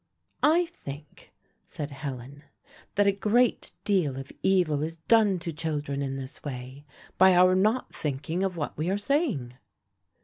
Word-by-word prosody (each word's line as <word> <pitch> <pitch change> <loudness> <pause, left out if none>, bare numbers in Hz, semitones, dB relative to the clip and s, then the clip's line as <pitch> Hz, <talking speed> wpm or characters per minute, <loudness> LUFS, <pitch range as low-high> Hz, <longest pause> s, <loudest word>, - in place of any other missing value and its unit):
"I 335 +4 +4
think," 150 - -11 0.3
said 145 -1 -6
Helen, 140 -1 -7 0.5
"that 205 - +4
a 200 - +5
great 220 +5 +1
deal 180 - +1
of 135 0 -7
evil 180 -7 +2
is 165 +2 -3
done 205 +3 +3
to 170 -1 -5
children 150 -3 -3
in 135 -1 -2
this 135 0 -8
way, 130 +1 -7 0.3
by 190 0 +7
our 185 +1 +6
not 215 +7 +1
thinking 150 +4 -3
of 190 -2 -1
what 145 - -3
we 155 +4 -2
are 195 - +1
saying." 205 - 0
165 Hz, 150 wpm, -27 LUFS, 140-200 Hz, 0.5 s, by